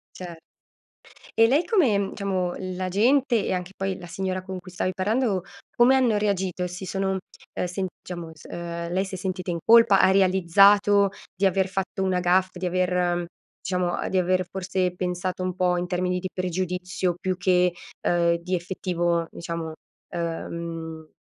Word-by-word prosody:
Cer 175 -2 -8 1.0
e 225 - +5
lei 285 +8 +3
come 320 - +3
mhmm, 200 -1 -1
diciamo, 190 -3 -1
la 185 0 -4
gente, 240 +3 +3
e - - -2
anche 180 0 -3
poi 195 -1 -2
la 180 - -10
signora 185 +1 -3
con 190 -1 -6
cui 185 0 -13
stavi 185 +1 -2
parlando, 210 +1 0 0.3
come 245 +3 +6
hanno 250 -4 +3
reagito? 190 -3 -1
Si 180 +2 -7
sono, 190 0 -1 0.4
ehm - - -2
sent 185 +1 -3
diciamo, 175 -2 -6
s 155 - -17
ehm, 170 0 -5
lei 185 +2 +1
si 190 -1 -6
è - - -5
sentita 185 0 -4
in 170 - -1
colpa, 225 -4 +7
ha - - +5
realizzato 195 +2 +5 0.3
di 195 - +1
aver 190 0 +2
fatto 190 0 -2
una 185 -1 +1
gaffe, 180 +1 +1
di 185 - -3
aver 180 -1 +1 0.4
diciamo, 180 -1 -1
di 190 - 0
aver 185 0 +1
forse 185 -1 -1
pensato 180 0 -3
un 185 -1 -2
po' 180 -1 +2
in 175 0 -2
termini 180 0 -1
di 185 +1 -4
pregiudizio 180 0 -2
più 185 -1 -1
che, 180 -1 +2 0.3
uhm, 170 -1 +3
di 180 +2 -2
effettivo 175 -1 -1
diciamo, 165 -1 -5 0.4
ehm, 165 -1 -5
185 Hz, 170 wpm, -25 LUFS, 175-195 Hz, 1.0 s, colpa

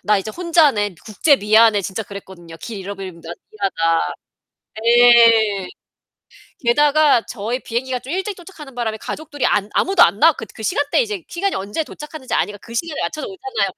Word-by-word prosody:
나 210 0 +2
이제 195 +3 -5
혼자네, 300 - +2
국제 275 +8 +3
미아네.' 215 -1 +4
진짜 195 +4 -4
그랬거든요. 190 -4 -11
'길 220 -4 -7
잃어버리면 190 -3 -8
나 165 - -10 0.2
미아다.' 165 - 0 0.7
네. 230 -4 +5 0.9
게다가 290 +1 +3
저희 235 +3 -4
비행기가 250 +2 -3
좀 265 - -9
일찍 385 +1 -3
도착하는 320 -7 -13
바람에 225 -3 -3
가족들이 290 +4 -5
안 205 0 0
아무도 385 0 +4
안 185 +5 +2
나왔 320 +2 +5
그 - - -6
그 - - -11
시간대 285 - +1
이제 420 -7 -4
시간이 390 +3 -2
언제 205 +11 -3
도착하는지 300 -3 -9
아니까 205 - -1
그 230 - -12
시간에 310 +5 -3
맞춰서 305 - -4
오잖아요. 265 - -3
235 Hz, 390 characters per minute, -19 LUFS, 205-300 Hz, 0.9 s, 네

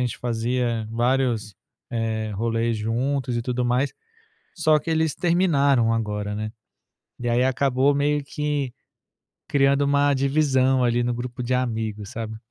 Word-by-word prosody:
gente 125 - -3
fazia 120 -1 -1
vários, 120 -3 0 0.4
eh, 110 -2 -2
rolês 115 +2 0
juntos 125 +4 -1
e - - 0
tudo 125 0 -1
mais. 125 +3 +1 0.6
Só 155 -3 +3
que 165 - -6
eles 160 -1 +1
terminaram 145 -9 +3
agora, 105 -2 -2
né. 110 0 -4 0.7
E 120 - -2
aí 120 +2 +2
acabou 130 +1 +2
meio 145 0 +1
que 145 -3 -2 0.8
criando 140 0 +3
uma 140 0 +3
divisão 135 -2 +2
ali 120 0 +2
no 120 0 0
grupo 120 0 -5
de 120 - -2
amigos, 110 -5 -2
sabe? 110 -1 -5
125 Hz, 140 wpm, -24 LUFS, 115-140 Hz, 0.8 s, Só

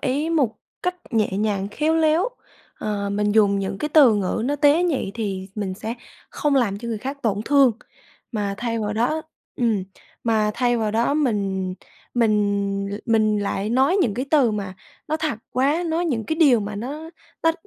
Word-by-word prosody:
ý 290 +5 -1
một 265 -10 +1 0.3
cách 360 0 0 0.2
nhẹ 220 -3 +1
nhàng, 200 -1 -1
khéo 310 +9 0
léo, 325 +6 +3 0.5
ờ, 200 -1 -2
mình 205 0 0
dùng 205 -2 +4
những 195 0 -3
cái 300 - -2
từ 285 -7 +6
ngữ 205 +2 -1
nó 285 +3 0
tế 295 +3 +4
nhị 300 - 0
thì 195 -4 -3
mình 195 -3 -3
sẽ 220 +3 -5 0.4
không 295 -1 0
làm 205 -6 +1
cho 235 +1 -6
người 225 - -2
khác 270 +5 -5
tổn 205 -3 0
thương. 275 -2 +5 0.6
Mà 205 -3 -1
thay 230 -1 -2
vào 210 -1 -2
đó 245 +9 0 0.3
ừm, 225 -5 +1 0.4
mà 215 -2 +2
thay 245 -1 +2
vào 220 -2 0
đó 230 +6 +1
mình 195 -9 0 0.4
mình 205 -3 +1
l - - -3
mình 215 -2 +3
lại 205 +1 -2
nói 265 +9 +3
những 210 - 0
cái 255 +4 -2
từ 280 -7 +4
mà 200 -3 -4 0.3
nó 310 - +1
thật 310 -8 -2
quá, 280 +7 +1
nói 330 +2 0
những 245 -10 -1
cái 315 - -1
điều 280 -8 +5
mà 205 0 -4
nó 290 +9 -6 0.3
nó 325 0 +4
225 Hz, 190 wpm, -23 LUFS, 205-285 Hz, 0.6 s, từ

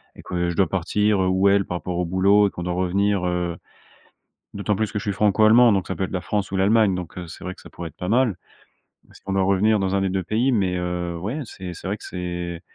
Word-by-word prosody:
et - - -12
que 90 -1 -2
je 85 - -3
dois 95 - +3
partir, 105 +2 +1
heu, - - +1
où 95 +2 +3
elle 100 0 +3
par 90 - -3
rapport 90 0 -4
au 90 - 0
boulot 100 +4 +4
et - - -5
qu'on 90 - -6
doit 90 0 -2
revenir, 95 +1 +1
heu- 90 -1 -2 1.0
d'autant 100 +1 -1
plus 110 0 -2
que 105 - -1
je - - -8
suis 105 - -1
franco-allemand 110 +4 +5
donc 95 -2 0
ça 95 - -3
peut 95 - -1
être - - -6
la 90 - -1
France 100 +2 -2
ou - - 0
l'Allemagne- 100 +1 +3
donc, 90 -1 -6
heu, 90 - -6
c'est 80 - -11
vrai 90 0 -5
que - - -16
ça - - -14
pourrait 85 -1 -7
être - - -21
pas 90 - -5
mal. 120 -3 +2 0.7
Mais - - -21
si - - -16
on 95 - -2
doit 95 - +2
revenir 100 +3 +3
dans 95 0 0
un 100 - +1
des 95 - 0
2 95 0 -1
pays 115 +8 +1
mais, 95 -6 +1
heu, 90 -1 -3
ouais 105 - -4
c'est 95 -5 -8
c'est 85 - -8
vrai 100 +2 -2
que - - -16
c'est 90 -1 -5
95 Hz, 280 wpm, -23 LUFS, 90-105 Hz, 1.0 s, franco-allemand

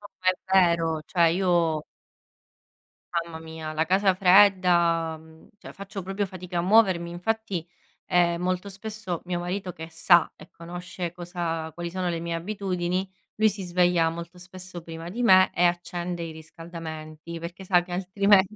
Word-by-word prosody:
No, 205 - -11
ma 185 - +1
è - - 0 0.4
vero, 165 -1 -1
cioè 170 -3 +3
io 170 -4 +1 1.4
Mamma 160 -1 -8
mia, 160 -1 -7
la 160 +1 +1
casa 190 +3 +3
fredda, 180 -4 +4
mhmm, 160 0 -18
cioè - - -10
faccio 195 -1 -7
proprio 195 +2 -2
fatica 180 -1 -7
a - - +2
muovermi, 185 -3 +4
infatti, 190 0 -2 0.4
ehm, 175 -1 +2
molto 185 +2 -1
spesso, 205 -3 -5
mio 175 -1 -2
marito 180 +2 -3
che 160 +1 -8
sa 170 +1 +4
e - - -15
conosce 175 +1 -6
cosa 170 -2 -4
quali 170 0 -5
sono 180 0 -2
le 170 -1 -2
mie 170 0 -4
abitudini, 185 0 -2 0.3
lui 215 0 +4
si 200 -1 -6
sveglia 175 -2 +2
molto 170 +2 -8
spesso 180 0 -9
prima 165 0 -8
di 235 +7 -3
me 185 -4 +6
e 175 - +1
accende 175 0 -1
i 165 - -5
riscaldamenti 160 0 -9
perché 170 +3 -8
sa 180 -1 +4
che 175 0 -8
altrimenti 195 +2 +3
175 Hz, 160 wpm, -26 LUFS, 165-190 Hz, 1.4 s, me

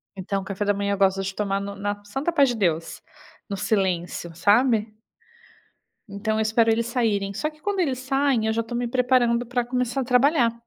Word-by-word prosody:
Então, 195 +1 -3
o - - -10
café 195 +1 -3
da 205 - +2
manhã 200 0 -1
eu - - -2
gosto 195 0 +2
de 195 0 -4
tomar 195 -1 -1
no 200 0 -6
na 205 +1 -4
santa 270 +11 -2
paz 280 -5 +4
de 245 - -1
Deus, 170 -6 -1 0.5
no 200 - -3
silêncio, 180 -4 -1
sabe? 215 +3 +2 1.1
Então, 215 +2 -2
eu - - +1
espero 225 +1 +2
eles 225 +1 +2
saírem, 215 -5 0
só 305 +9 -2
que 305 0 -21
quando 405 +1 -2
eles 270 -8 0
saem, 270 -3 +1
eu 220 - +1
já 230 - 0
estou 230 +1 -5
me 240 0 -1
preparando 245 -1 +2
para 245 +1 -1
começar 250 +1 -1
a - - -1
trabalhar. 250 -1 +3
225 Hz, 210 wpm, -24 LUFS, 200-250 Hz, 1.1 s, paz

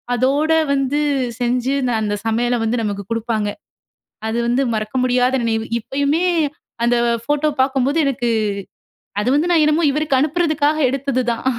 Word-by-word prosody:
அதோட 275 +6 +1 0.2
வந்து 275 +1 0 0.4
செஞ்சு 250 +2 0 0.3
அந்த 205 -1 -1
சமையல 240 +2 +1
வந்து 225 +2 0
நமக்கு 200 -1 -3
கொடுப்பாங்க. 225 -2 -1 0.8
அது 225 +1 -2
வந்து 245 +3 +2
மறக்க 215 +3 -3
முடியாத 250 +1 +2
நினைவு. 225 -1 0
இப்பயுமே 285 +8 0 0.6
அந்த 240 +1 +3 0.3
போட்டோ 295 +1 +1
பாக்கும்போது 270 +2 +1
எனக்கு 245 -3 -1 0.9
அது 245 - 0
வந்து 330 +4 +1
நான் 330 -3 +4
என்னமோ? 305 +2 +2
இவருக்கு 295 -2 0
அனுப்புறதுக்காக 310 -1 +1
எடுத்தது 275 -1 -1
தான் 230 - -8
260 Hz, 135 wpm, -19 LUFS, 235-290 Hz, 0.9 s, நான்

